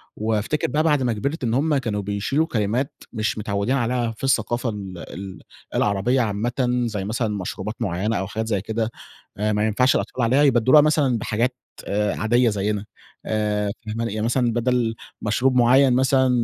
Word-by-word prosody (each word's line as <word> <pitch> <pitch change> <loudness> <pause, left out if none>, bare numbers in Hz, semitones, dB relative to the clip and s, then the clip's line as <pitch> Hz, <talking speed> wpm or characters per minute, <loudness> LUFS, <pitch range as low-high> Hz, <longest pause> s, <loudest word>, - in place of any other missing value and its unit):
وأفتكر 110 +6 -1
بقى 150 +5 +1
بعد 150 -4 +2
ما 120 -2 +1
كبرت 140 +8 -3
إن 115 -2 0
هم 145 +3 +2
كانوا 110 -6 -2
بيشيلوا 105 +10 0
كلمات 115 +3 -1 0.2
مش 110 -1 -1
متعودين 105 +4 -1
عليها 120 -2 0
في - - -14
الثقافة 120 -2 +1
ال 100 -4 -6 0.2
ال 95 -1 -8 0.4
العربية 105 +6 +2
عامةً 120 +3 0
زي 105 -4 -3
مثلًا 115 +2 -1
مشروبات 100 +3 -5
مُعيّنة 100 +3 -1
أو 95 - -2
حاجات 110 +2 -3
زي 100 -4 0
كده. 110 +2 -2 0.5
آآ 105 +1 0
ما 105 +1 +1
ينفعش 125 +5 +3
الأطفال 125 - -1
عليها، 130 +5 +3
يبدلوها 130 +2 +6
مثلًا 145 -5 +2
بحاجات 115 +3 -1 0.4
عادية 110 +4 +2
زينا. 105 0 -1 0.4
آآ 105 -1 0 0.2
فاهماني؟ 115 0 -3
يعني 110 0 -2
مثلًا 120 0 +1
بدل 120 -1 +1 0.3
مشروب 125 +5 +1
مُعيّن 125 +2 +5
مثلًا 130 0 +3
115 Hz, 165 wpm, -23 LUFS, 105-125 Hz, 0.5 s, يبدلوها